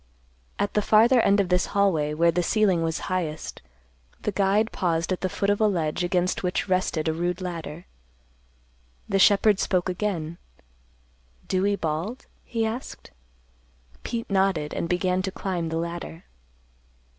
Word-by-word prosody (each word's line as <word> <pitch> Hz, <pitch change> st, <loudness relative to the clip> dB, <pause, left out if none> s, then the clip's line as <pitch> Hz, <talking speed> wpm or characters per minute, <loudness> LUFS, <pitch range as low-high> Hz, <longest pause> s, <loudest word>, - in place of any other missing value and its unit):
At 205 Hz, -, -1 dB
the 210 Hz, -, +2 dB
farther 230 Hz, +4 st, +5 dB
end 200 Hz, -1 st, +3 dB
of 195 Hz, -3 st, +1 dB
this 180 Hz, 0 st, +2 dB
hallway 160 Hz, -7 st, +2 dB
where 170 Hz, +2 st, +4 dB
the 180 Hz, +2 st, 0 dB
ceiling 190 Hz, -2 st, +2 dB
was 165 Hz, -1 st, -1 dB
highest, 165 Hz, -4 st, -3 dB, 0.6 s
the 210 Hz, -, 0 dB
guide 200 Hz, +3 st, +2 dB
paused 170 Hz, -1 st, -1 dB
at 185 Hz, -, -1 dB
the 185 Hz, -, 0 dB
foot 200 Hz, +2 st, 0 dB
of 205 Hz, -, 0 dB
a 215 Hz, -, +5 dB
ledge 170 Hz, -4 st, -1 dB
against 180 Hz, +1 st, 0 dB
which 180 Hz, +2 st, -1 dB
rested 185 Hz, -4 st, 0 dB
a 160 Hz, -, +1 dB
rude 175 Hz, +2 st, -2 dB
ladder. 170 Hz, -2 st, -6 dB, 1.2 s
The 195 Hz, -, +1 dB
shepherd 205 Hz, +1 st, +5 dB
spoke 185 Hz, -1 st, 0 dB
again, 175 Hz, -4 st, -3 dB, 1.1 s
"Dewey 195 Hz, +2 st, +1 dB
Bald?" 170 Hz, +8 st, -3 dB, 0.2 s
he 230 Hz, -2 st, -2 dB
asked. 230 Hz, +4 st, -6 dB, 0.9 s
Pete 230 Hz, -1 st, -4 dB
nodded, 190 Hz, -6 st, +1 dB
and 170 Hz, -, -3 dB
began 180 Hz, +1 st, +1 dB
to 190 Hz, 0 st, -3 dB
climb 180 Hz, -4 st, -3 dB
the 165 Hz, -, -2 dB
ladder. 170 Hz, 0 st, -5 dB
185 Hz, 150 wpm, -25 LUFS, 170-200 Hz, 1.2 s, farther